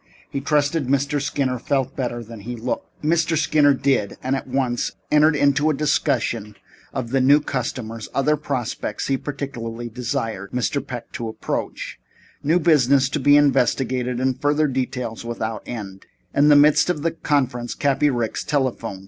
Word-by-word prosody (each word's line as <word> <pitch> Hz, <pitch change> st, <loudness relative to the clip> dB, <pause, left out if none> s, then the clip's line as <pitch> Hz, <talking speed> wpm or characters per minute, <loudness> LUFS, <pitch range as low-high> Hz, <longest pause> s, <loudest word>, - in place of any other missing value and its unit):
He 140 Hz, -, -3 dB
trusted 145 Hz, 0 st, +1 dB
Mr. 140 Hz, +1 st, +1 dB
Skinner 135 Hz, -3 st, -1 dB
felt 135 Hz, +1 st, -1 dB
better 120 Hz, -3 st, -3 dB
than 115 Hz, 0 st, -10 dB
he 120 Hz, +4 st, -6 dB
looked. 120 Hz, +5 st, -5 dB
Mr. 160 Hz, +1 st, +2 dB
Skinner 145 Hz, -2 st, +4 dB
did, 130 Hz, -7 st, 0 dB
and 130 Hz, +1 st, 0 dB
at 135 Hz, -, -5 dB
once 125 Hz, -2 st, -1 dB, 0.2 s
entered 150 Hz, +1 st, +5 dB
into 145 Hz, +1 st, +3 dB
a 155 Hz, -, +1 dB
discussion 115 Hz, -7 st, 0 dB, 0.4 s
of 115 Hz, -, -4 dB
the 135 Hz, 0 st, +2 dB
new 140 Hz, +3 st, +6 dB
customers, 120 Hz, -5 st, -4 dB
other 150 Hz, +3 st, +2 dB
prospects 130 Hz, -4 st, -3 dB
he 135 Hz, -, +3 dB
particularly 120 Hz, -5 st, -5 dB
desired 115 Hz, -4 st, -4 dB
Mr. 125 Hz, +2 st, 0 dB
Peck 125 Hz, -4 st, -7 dB
to 115 Hz, -, -4 dB
approach, 110 Hz, -, -4 dB, 0.4 s
new 160 Hz, +5 st, +2 dB
business 140 Hz, -5 st, +4 dB
to 150 Hz, -, -2 dB
be 145 Hz, +2 st, +6 dB
investigated, 130 Hz, -3 st, +1 dB
and 130 Hz, 0 st, -1 dB
further 150 Hz, +1 st, +2 dB
details 125 Hz, -4 st, -3 dB
without 115 Hz, -2 st, -4 dB
end. 100 Hz, -5 st, -7 dB, 0.3 s
And 145 Hz, -, +4 dB
in -, -, +6 dB
the 145 Hz, -, +7 dB
midst 150 Hz, +4 st, +5 dB
of 155 Hz, -5 st, -1 dB
this 165 Hz, -, 0 dB
conference 125 Hz, -5 st, 0 dB
Cappy 145 Hz, +1 st, +2 dB
Riggs 120 Hz, -4 st, -2 dB
telephoned. 125 Hz, -8 st, -1 dB
135 Hz, 165 wpm, -22 LUFS, 120-145 Hz, 0.4 s, the